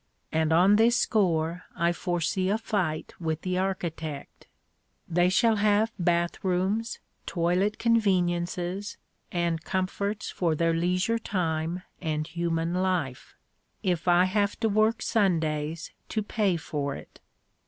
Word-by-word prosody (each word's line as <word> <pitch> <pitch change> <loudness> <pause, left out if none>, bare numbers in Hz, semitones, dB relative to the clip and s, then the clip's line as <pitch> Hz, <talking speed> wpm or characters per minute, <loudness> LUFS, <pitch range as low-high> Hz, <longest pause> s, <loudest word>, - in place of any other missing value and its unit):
And 160 0 +1
on 185 +5 +5
this 230 +2 +5
score 170 -7 +1
I 170 +1 +2
foresee 180 +2 -1
a 210 - +2
fight 185 -8 -2
with 160 -2 -2
the 185 0 0
architect. 165 -6 -4 0.6
They 175 +2 +3
shall 225 +3 +3
have 210 +2 +3
bath 175 0 0
rooms, 195 +5 0 0.3
toilet 180 +4 +1
conveniences, 185 -3 0 0.3
and 170 -2 -1
comforts 200 +3 -2
for 170 -3 0
their 165 +1 +2
leisure 180 +7 +1
time 170 -3 -2 0.2
and 155 -3 -1
human 165 0 -1
life 180 -8 -1 0.5
if 180 -2 -1
I 175 0 +6
have 200 +2 0
to 225 - +2
work 215 +2 +2
Sundays 160 -6 0 0.2
to 215 - -1
pay 205 -4 +1
for 145 -3 -3
it. - - -12
180 Hz, 125 wpm, -27 LUFS, 165-200 Hz, 0.6 s, I